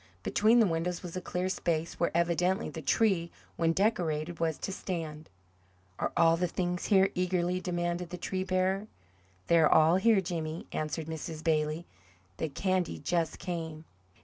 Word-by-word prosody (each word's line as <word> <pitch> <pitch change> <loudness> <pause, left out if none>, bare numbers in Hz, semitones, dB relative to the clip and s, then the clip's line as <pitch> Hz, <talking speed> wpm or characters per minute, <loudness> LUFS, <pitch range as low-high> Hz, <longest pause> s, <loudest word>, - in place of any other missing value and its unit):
Between 220 - +4
the 225 - +6
windows 170 0 -1
was 175 -1 -7
a 185 - -3
cleared 180 +1 -2
space, 165 -2 -2
where 170 - +2
evidently 175 +2 +1
the 160 - -7
tree, 175 +1 +2 0.3
when 165 -1 +2
decorated, 170 -4 0
was 165 -2 0
to - - -4
stand. 160 -5 -5 0.7
"Are - - -1
all 165 0 +5
the 180 +1 +1
things 180 0 -2
here?" 195 -2 +4
eagerly 180 0 0
demanded 175 -1 -2
the 180 - -6
tree 185 +1 -2
bearer. 190 +2 0 0.6
"They're 165 -2 +4
all 160 +3 +6
here, 215 +1 +4
Jimmy," 165 -3 -4
answered 155 +1 -3
Mrs. 160 0 -6
Bailey. 155 +1 0 0.5
"The 160 - -2
candy 185 +3 -1
just 170 -2 -1
came." 160 -3 -5
175 Hz, 155 wpm, -30 LUFS, 160-185 Hz, 0.7 s, the